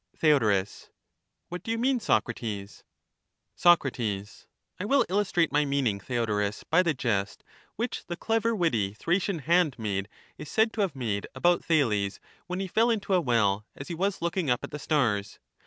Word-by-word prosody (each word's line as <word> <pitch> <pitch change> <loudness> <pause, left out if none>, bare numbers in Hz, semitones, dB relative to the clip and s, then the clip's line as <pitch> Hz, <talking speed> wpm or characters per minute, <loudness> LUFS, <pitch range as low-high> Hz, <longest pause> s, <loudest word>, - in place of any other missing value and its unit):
Theod, 110 -11 +3 0.8
What 180 0 -5
do 220 - -9
you 230 - 0
mean, 255 +2 +1
Socrates? 110 - -2 0.7
Soc, 175 -3 +5
I 105 - -6
will 275 +6 +3
illustrate 185 -4 +1
my 150 +1 +3
meaning, 140 -8 0
Theodorus, 105 -2 -1
by 160 +3 +3
the 165 -4 0
jest 105 -6 -2 0.3
which 235 +2 -4
the 175 - -4
clever 225 +2 0
witty 115 - 0
Thracian 180 - 0
handmaid 120 - +1 0.3
is 145 - -8
said 220 0 +2
to 220 - -1
have 185 -7 0
made 110 -6 -2
about 175 0 +2
Thales, 105 -11 +1 0.3
when 180 +1 -3
he 195 - -2
fell 225 +6 +2
into 205 -4 0
a 180 - +4
well 105 -6 +1
as 140 - -9
he - - -3
was 190 +2 -1
looking 170 -2 -1
up 125 0 +1
at - - -6
the 150 - -6
stars. 115 -11 0
150 Hz, 165 wpm, -27 LUFS, -, 0.8 s, Soc